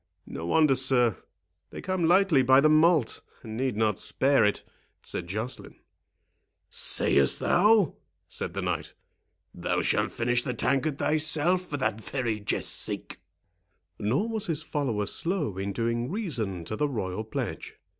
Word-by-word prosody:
"No 85 Hz, -, -7 dB
wonder, 155 Hz, -, +4 dB
sir; 130 Hz, -4 st, +2 dB, 0.5 s
they -, -, -9 dB
come 185 Hz, -3 st, -1 dB
lightly 180 Hz, -5 st, +4 dB
by 130 Hz, +1 st, +5 dB
the 145 Hz, -, +4 dB
malt, 155 Hz, -4 st, +3 dB, 0.2 s
and 110 Hz, -1 st, -7 dB
need 130 Hz, -2 st, -2 dB
not 110 Hz, -3 st, +1 dB
spare 140 Hz, +1 st, +2 dB
it," 105 Hz, 0 st, 0 dB, 0.4 s
said 85 Hz, -, -5 dB
Joceline. 110 Hz, +7 st, -4 dB, 1.0 s
"Say'st 70 Hz, -1 st, +3 dB
thou?" 205 Hz, -2 st, +3 dB, 0.3 s
said -, -, -4 dB
the -, -, -3 dB
knight; -, -, -3 dB, 0.6 s
"thou -, -, -2 dB
shalt -, -, +1 dB
finish 120 Hz, +1 st, 0 dB
the 125 Hz, -, -4 dB
tankard 135 Hz, +4 st, 0 dB
thyself 155 Hz, +5 st, +1 dB
for 145 Hz, -, -4 dB
that 110 Hz, -5 st, -2 dB
very 115 Hz, -3 st, -3 dB
jest's 100 Hz, -, 0 dB
sake." -, -, -4 dB, 0.8 s
Nor 115 Hz, -, 0 dB
was 220 Hz, -2 st, -2 dB
his 160 Hz, -2 st, -2 dB
follower 125 Hz, -11 st, -2 dB
slow 165 Hz, -, -1 dB
in 100 Hz, +1 st, -3 dB
doing 115 Hz, +3 st, -2 dB
reason 120 Hz, -, -3 dB
to 110 Hz, -, -4 dB
the 150 Hz, +5 st, 0 dB
royal 105 Hz, -5 st, -3 dB
pledge. 110 Hz, -, -5 dB
130 Hz, 145 wpm, -27 LUFS, 110-160 Hz, 1.0 s, by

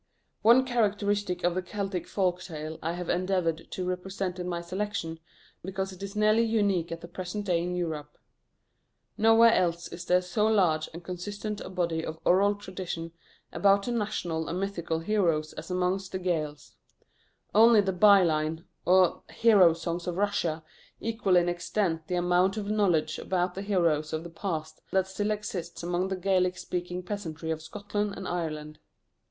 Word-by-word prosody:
One 240 Hz, +4 st, +6 dB
characteristic 205 Hz, -5 st, 0 dB
of 175 Hz, 0 st, +2 dB
the 185 Hz, -, -1 dB
Celtic 195 Hz, 0 st, -4 dB
folk 185 Hz, -2 st, 0 dB
tale 155 Hz, -3 st, -6 dB
I 165 Hz, +2 st, -2 dB
have 175 Hz, -1 st, -5 dB
endeavoured 180 Hz, -3 st, 0 dB
to 185 Hz, -, -4 dB
represent 185 Hz, 0 st, -3 dB
in 180 Hz, -, -3 dB
my 170 Hz, -1 st, -2 dB
selection, 180 Hz, -2 st, -4 dB, 0.4 s
because 190 Hz, +1 st, -3 dB
it 185 Hz, 0 st, -12 dB
is 200 Hz, +1 st, -6 dB
nearly 215 Hz, +1 st, +4 dB
unique 200 Hz, -7 st, +1 dB
at 165 Hz, 0 st, -5 dB
the 170 Hz, -, -8 dB
present 185 Hz, +4 st, -5 dB
day 175 Hz, -3 st, +1 dB
in 180 Hz, +1 st, -2 dB
Europe. 155 Hz, -4 st, -4 dB, 1.0 s
Nowhere 225 Hz, +1 st, +6 dB
else 170 Hz, -1 st, +1 dB
is 170 Hz, +1 st, -8 dB
there 180 Hz, +1 st, +3 dB
so 195 Hz, +4 st, +1 dB
large 175 Hz, -8 st, +2 dB
and 170 Hz, +2 st, -9 dB
consistent 205 Hz, +4 st, -5 dB
a -, -, -7 dB
body 170 Hz, -3 st, -1 dB
of 160 Hz, 0 st, -5 dB
oral 200 Hz, +3 st, +4 dB
tradition 185 Hz, -4 st, -6 dB, 0.4 s
about 200 Hz, 0 st, +4 dB
the 245 Hz, -, -2 dB
national 180 Hz, -8 st, -2 dB
and 180 Hz, -, -2 dB
mythical 170 Hz, -5 st, -2 dB
heroes 165 Hz, -6 st, +1 dB
as -, -, -8 dB
amongst 185 Hz, +1 st, -1 dB
the -, -, 0 dB
Gaels. 155 Hz, -5 st, -3 dB, 0.8 s
Only 225 Hz, +1 st, +7 dB
the 195 Hz, -1 st, -1 dB
byline, 170 Hz, -5 st, +4 dB, 0.2 s
or 185 Hz, 0 st, +4 dB
hero 200 Hz, -7 st, +5 dB
songs 170 Hz, +1 st, -4 dB
of 175 Hz, 0 st, -2 dB
Russia, 175 Hz, -6 st, 0 dB, 0.4 s
equal 220 Hz, -4 st, 0 dB
in 175 Hz, 0 st, +4 dB
extent 175 Hz, -1 st, -1 dB
the 180 Hz, -, -1 dB
amount 180 Hz, +3 st, +2 dB
of 205 Hz, -1 st, -2 dB
knowledge 175 Hz, -7 st, +1 dB
about 180 Hz, -1 st, -1 dB
the 195 Hz, -, -5 dB
heroes 170 Hz, -7 st, +1 dB
of 160 Hz, +1 st, -2 dB
the 170 Hz, -, -9 dB
past 160 Hz, -3 st, -4 dB
that 190 Hz, -1 st, +2 dB
still 205 Hz, +2 st, -2 dB
exists 200 Hz, -6 st, -4 dB
among 175 Hz, +2 st, 0 dB
the 190 Hz, -, -2 dB
Gaelic 185 Hz, -1 st, +1 dB
speaking 180 Hz, 0 st, -4 dB
peasantry 165 Hz, -5 st, -4 dB
of 160 Hz, -1 st, -3 dB
Scotland 205 Hz, +4 st, -3 dB
and 190 Hz, -, -6 dB
Ireland. 155 Hz, -3 st, -4 dB
180 Hz, 170 wpm, -28 LUFS, 170-200 Hz, 1.0 s, Only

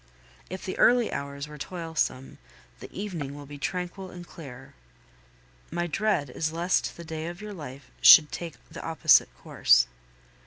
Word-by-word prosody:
If 185 Hz, +1 st, -7 dB
the 185 Hz, -, -4 dB
early 245 Hz, -1 st, +4 dB
hours 140 Hz, +1 st, -5 dB
were 150 Hz, 0 st, -11 dB
toilsome, 160 Hz, -6 st, -3 dB, 0.4 s
the -, -, -10 dB
evening 170 Hz, -9 st, -5 dB
will 145 Hz, 0 st, -9 dB
be 145 Hz, 0 st, -10 dB
tranquil 180 Hz, +4 st, -4 dB
and 175 Hz, -1 st, -10 dB
clear. 135 Hz, -8 st, -11 dB, 1.0 s
My 175 Hz, +1 st, -2 dB
dread 175 Hz, -6 st, 0 dB
is 155 Hz, +4 st, -2 dB
lest 170 Hz, +3 st, 0 dB
the 170 Hz, -, -8 dB
day 160 Hz, 0 st, -5 dB
of 175 Hz, +1 st, -7 dB
your 210 Hz, 0 st, -7 dB
life 140 Hz, -6 st, -10 dB
should 150 Hz, -2 st, +9 dB
take 170 Hz, -2 st, -6 dB
the 165 Hz, +1 st, -9 dB
opposite 165 Hz, -1 st, +4 dB
course. -, -, +4 dB
165 Hz, 155 wpm, -27 LUFS, 145-180 Hz, 1.0 s, should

